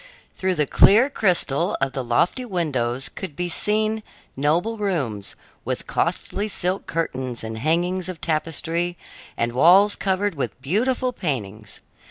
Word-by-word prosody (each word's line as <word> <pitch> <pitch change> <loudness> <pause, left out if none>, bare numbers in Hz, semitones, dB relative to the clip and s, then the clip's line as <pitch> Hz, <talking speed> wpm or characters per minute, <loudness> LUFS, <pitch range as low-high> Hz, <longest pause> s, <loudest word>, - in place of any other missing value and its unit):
Through 190 -1 0
the 150 -2 +2
clear 225 - +5
crystal 180 - +1
of 135 0 0
the 130 -1 -3
lofty 125 - +1
windows 135 - -1
could 175 -7 -7
be 180 +2 -2
seen 215 +4 0 0.3
noble 165 +11 +1
rooms, 140 - -2 0.3
with - - -3
costly 205 +2 -1
silk 185 -2 -2
curtains 130 -7 -3
and 110 0 -5
hangings 175 +6 0
of 180 -3 -6
tapestry 165 +2 -2 0.4
and 120 0 0
walls 185 +10 +6
covered 195 +1 0
with 140 -4 -4
beautiful 245 - 0
paintings. 110 - -4
170 Hz, 135 wpm, -23 LUFS, 135-195 Hz, 0.4 s, walls